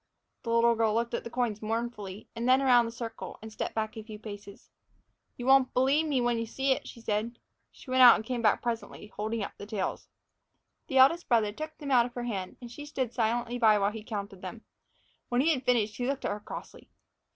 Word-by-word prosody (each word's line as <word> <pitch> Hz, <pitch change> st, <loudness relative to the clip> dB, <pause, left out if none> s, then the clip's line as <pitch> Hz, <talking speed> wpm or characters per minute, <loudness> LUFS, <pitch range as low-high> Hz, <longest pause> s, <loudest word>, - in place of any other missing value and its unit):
The 230 Hz, -, -6 dB
little 230 Hz, 0 st, +4 dB
girl 220 Hz, -1 st, +1 dB
looked 235 Hz, +1 st, -1 dB
at -, -, -2 dB
the -, -, -6 dB
coins 235 Hz, -4 st, -1 dB
mournfully, 215 Hz, -3 st, -4 dB
and 235 Hz, +2 st, -1 dB
then 260 Hz, +1 st, +6 dB
around 250 Hz, -3 st, +5 dB
the -, -, -5 dB
circle, 230 Hz, -1 st, -7 dB
and 220 Hz, 0 st, -10 dB
stepped -, -, -4 dB
back 220 Hz, -1 st, -2 dB
a 220 Hz, -, -6 dB
few 215 Hz, -1 st, -9 dB
paces. 205 Hz, -2 st, -10 dB, 0.7 s
"You 245 Hz, -, -6 dB
won't 265 Hz, -1 st, +4 dB
b'lieve 275 Hz, +5 st, +3 dB
me 275 Hz, -4 st, +1 dB
when 240 Hz, -1 st, +1 dB
you 230 Hz, -, -3 dB
see 270 Hz, +4 st, 0 dB
it," 265 Hz, -, 0 dB
she -, -, -10 dB
said. 225 Hz, +1 st, -2 dB, 0.3 s
She 255 Hz, -, -12 dB
went 260 Hz, 0 st, +4 dB
out 245 Hz, -2 st, +10 dB
and 220 Hz, -, -5 dB
came 245 Hz, 0 st, -2 dB
back 215 Hz, -2 st, +2 dB
presently, 230 Hz, -2 st, -5 dB
holding 215 Hz, +1 st, -2 dB
up -, -, -5 dB
the 205 Hz, -, -8 dB
tails. 205 Hz, -3 st, -3 dB, 0.8 s
The 270 Hz, -, -1 dB
eldest 280 Hz, +7 st, +5 dB
brother 225 Hz, -4 st, +3 dB
took 310 Hz, +7 st, -7 dB
them 285 Hz, -3 st, -5 dB
out 245 Hz, -2 st, +5 dB
of 245 Hz, -, -15 dB
her 245 Hz, -, -3 dB
hand, 195 Hz, -6 st, -4 dB
and 240 Hz, -2 st, -10 dB
she 290 Hz, +4 st, -9 dB
stood 260 Hz, -5 st, -3 dB
silently 240 Hz, +1 st, 0 dB
by 215 Hz, -3 st, +5 dB
while 200 Hz, 0 st, +1 dB
he 220 Hz, 0 st, -8 dB
counted 200 Hz, -3 st, -6 dB
them. 205 Hz, +5 st, -8 dB, 0.7 s
When 245 Hz, -, +1 dB
he 320 Hz, +3 st, +4 dB
had 260 Hz, -3 st, -4 dB
finished, 220 Hz, -4 st, +1 dB
he 245 Hz, -, -2 dB
looked 275 Hz, 0 st, -2 dB
at -, -, 0 dB
her 205 Hz, -, -3 dB
crossly. -, -, -10 dB
235 Hz, 230 wpm, -29 LUFS, 215-250 Hz, 0.8 s, out